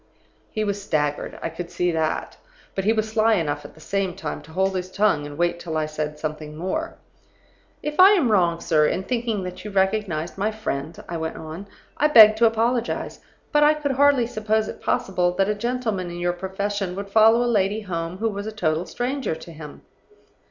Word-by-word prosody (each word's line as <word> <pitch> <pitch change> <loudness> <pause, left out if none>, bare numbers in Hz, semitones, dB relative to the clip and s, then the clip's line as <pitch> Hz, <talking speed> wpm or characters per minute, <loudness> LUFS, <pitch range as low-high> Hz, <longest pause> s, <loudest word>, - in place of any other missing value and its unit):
"He 215 - -2
was 200 -1 -2
staggered; 150 -5 -1
I - - -1
could 170 +1 -7
see 180 0 0
that. 160 -1 -2 0.4
But 195 - -3
he 215 - +4
was 220 -1 0
sly 220 0 +3
enough 145 -5 -2
at - - -12
the - - -16
same 190 +2 -2
time 150 - -5
to 160 - -15
hold 190 +3 0
his 185 0 -3
tongue 190 -8 +1
and 145 0 -9
wait 175 0 0
till 160 -2 -4
I 155 - 0
said 155 0 -4
something 155 0 -5
more. 250 - -3 0.9
"'If 300 +2 -4
I 385 +2 +9
am 300 - +2
wrong, 175 -4 +3
sir, 150 -2 +3
in 185 - -1
thinking 230 -3 -2
that 180 0 -7
you 210 - -6
recognized 190 -4 -1
my 210 +2 +1
friend,' 165 -9 -5
I 170 - -4
went 160 0 -4
on, 160 +5 -8 0.3
'I 300 - +4
beg 220 -7 +9
to 230 +1 +5
apologize. 230 +2 -1 0.3
But 295 - +3
I 300 +1 +6
could 295 -2 -2
hardly 275 -2 +4
suppose 215 -1 0
it - - -8
possible 180 -2 0
that 195 +1 +1
a - - +2
gentleman 220 -5 -2
in 175 - -7
your 175 0 0
profession 190 +1 -3
would 200 0 -6
follow 225 +3 +6
a - - -1
lady 210 -2 +1
home 170 -3 -4
who 225 +3 0
was 205 0 -5
a - - -3
total 170 -5 -1
stranger 255 - -2
to 170 - -11
him. 155 -2 -11
195 Hz, 210 wpm, -23 LUFS, 165-220 Hz, 0.9 s, I